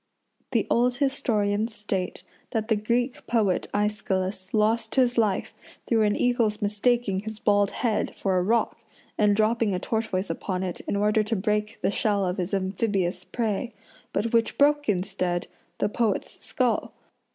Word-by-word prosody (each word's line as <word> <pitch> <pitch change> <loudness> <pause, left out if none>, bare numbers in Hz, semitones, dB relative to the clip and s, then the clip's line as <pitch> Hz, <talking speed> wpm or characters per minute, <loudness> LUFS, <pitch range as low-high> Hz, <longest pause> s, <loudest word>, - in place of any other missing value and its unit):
The - - +1
old 245 +1 +2
historians 225 -6 0
state 195 -3 -3 0.3
that 220 0 -2
the 220 - +4
Greek 240 +4 -1
poet 210 -6 +1
Aeschylus 195 -2 -1
lost 220 +1 +1
his 250 -2 +3
life 215 -5 +1 0.3
through 225 -2 +2
an 210 -1 +3
eagle's 235 -4 +1
mistaking 210 -1 +1
his 220 +1 -6
bald 205 -1 +3
head 225 -1 -1
for 190 -2 0
a 180 - +3
rock 225 +5 +1 0.4
and 210 -1 +3
dropping 220 -1 +2
a - - -1
tortoise 195 -3 -1
upon 185 +2 -3
it 180 -2 -4
in - - 0
order 210 +2 +3
to 215 +2 -1
break 210 +2 -1
the - - +2
shell 205 -2 +1
of 180 0 -2
his 180 0 -2
amphibious 190 -2 -1
prey, 220 +4 -2 0.4
but 220 +3 -1
which 230 -1 +2
broke, 290 -2 +3
instead, 185 -2 0 0.3
the - - +1
poet's 220 0 -1
skull. - - 0
210 Hz, 155 wpm, -26 LUFS, 195-230 Hz, 0.4 s, the